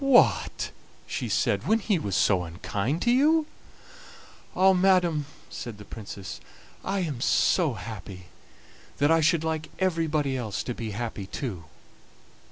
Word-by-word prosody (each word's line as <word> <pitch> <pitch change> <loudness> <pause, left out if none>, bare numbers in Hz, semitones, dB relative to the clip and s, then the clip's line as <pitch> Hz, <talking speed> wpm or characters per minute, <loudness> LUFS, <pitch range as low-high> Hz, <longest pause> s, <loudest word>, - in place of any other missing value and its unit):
"What!" 270 -3 +4 0.3
she - - -3
said, - - +1
"when 220 - +4
he 205 -4 0
was 100 -9 -2
so 95 -3 +3
unkind 100 - -2
to 240 - +3
you?" 305 +5 +4 1.1
"Ah! 190 +1 +6
madam," 180 -5 +3 0.2
said 115 -4 -6
the 105 - -11
Princess, 100 -3 -8 0.4
"I 195 0 -1
am 145 -9 -3
so 155 0 +3
happy 100 -5 -8 0.7
that 145 +2 +3
I 165 0 +5
should 160 +1 +3
like 160 -1 -2
everybody 160 -6 +1
else 110 -5 -3
to 125 - -3
be 115 -1 -5
happy 110 -5 -4
too." 100 -9 -5
150 Hz, 140 wpm, -27 LUFS, -, 1.1 s, Ah